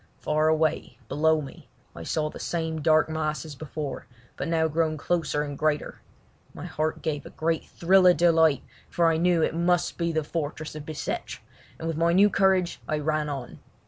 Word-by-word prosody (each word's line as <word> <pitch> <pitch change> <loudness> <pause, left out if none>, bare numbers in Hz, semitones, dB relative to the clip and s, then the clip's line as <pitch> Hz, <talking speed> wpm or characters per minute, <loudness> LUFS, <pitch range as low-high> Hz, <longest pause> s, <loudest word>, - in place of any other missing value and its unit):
Far 155 +1 +1
away, 160 -1 0
below 160 +1 +2
me, 140 - -11 0.3
I 85 - -8
saw 155 - -1
the - - -10
same 160 -2 -3
dark 155 +1 +4
mass 155 0 -2
as 155 - -8
before, 145 0 -6 0.3
but - - -4
now 165 -1 +2
grown 160 0 0
closer 155 -2 -1
and 145 -1 -5
greater. 150 +1 -1 0.5
My - - -7
heart 155 +1 -2
gave 150 -2 -2
a - - -10
great 165 0 -1
thrill 185 +2 +4
of 180 - +6
delight, 160 -4 +4 0.3
for 170 - +1
I 160 - +1
knew 175 0 +3
that - - +3
it - - -8
must 175 +1 +1
be 170 0 0
the 160 -1 0
fortress 155 0 -4
of 150 -1 -8
Bicêtre, 155 -1 -4 0.4
and 165 - -5
with 165 -2 -2 0.2
new 205 +2 +5
courage 190 -2 +2
I 155 - 0
ran 155 0 -1
on. 135 -4 -6
160 Hz, 190 wpm, -26 LUFS, 150-165 Hz, 0.5 s, of